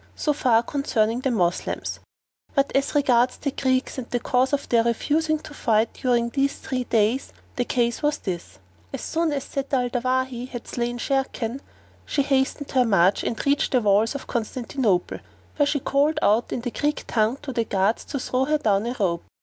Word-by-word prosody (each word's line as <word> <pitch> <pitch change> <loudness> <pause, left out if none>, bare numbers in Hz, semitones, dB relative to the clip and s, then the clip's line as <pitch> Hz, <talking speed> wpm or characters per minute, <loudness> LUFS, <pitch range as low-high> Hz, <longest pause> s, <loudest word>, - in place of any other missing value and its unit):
So 300 - 0
far 235 -5 +3
concerning 235 -4 0
the 265 - 0
Moslems; 180 -7 -1 0.6
but 275 -1 +1
as 275 +2 +1
regards 250 -3 +3
the 280 - -2
Greeks 260 -1 0
and 245 - -7
the 245 - 0
cause 255 +2 +1
of 285 -1 -1
their 230 -1 +3
refusing 310 +7 +1
to 305 0 -11
fight 225 -5 +1
during 240 -2 +1
these 275 +3 0
three 255 -2 -3
days 225 +3 +1 0.2
the 245 - 0
case 235 -1 0
was 295 -1 +1
this. 170 - -6 0.3
As - - -5
soon 330 -1 0
as 280 -2 -2
Zat 275 -1 -5
al 250 -1 0
Dawahi 255 0 -1
had 240 -3 -7
slain 240 0 -2
Sharrkan, 265 -1 -2 0.4
she 285 - 0
hastened 275 +1 0
her 255 -2 +4
march 195 -4 +3
and 230 - -3
reached 280 0 +1
the 250 - +4
walls 210 +4 +3
of 280 - -5
Constantinople, 230 -4 -1 0.4
where 290 -1 +3
she 285 0 +1
called 285 +4 +1
out 220 +3 +3
in 245 - -2
the 245 0 -3
Greek 295 +4 -1
tongue 225 +3 +1
to 270 -3 -5
the 230 -2 0
guards 200 +2 +1
to 285 - -4
throw 255 0 0
her 305 +2 +2
down 215 -6 +1
a 245 - -3
rope. 170 -4 0
250 Hz, 190 wpm, -24 LUFS, 230-275 Hz, 0.6 s, her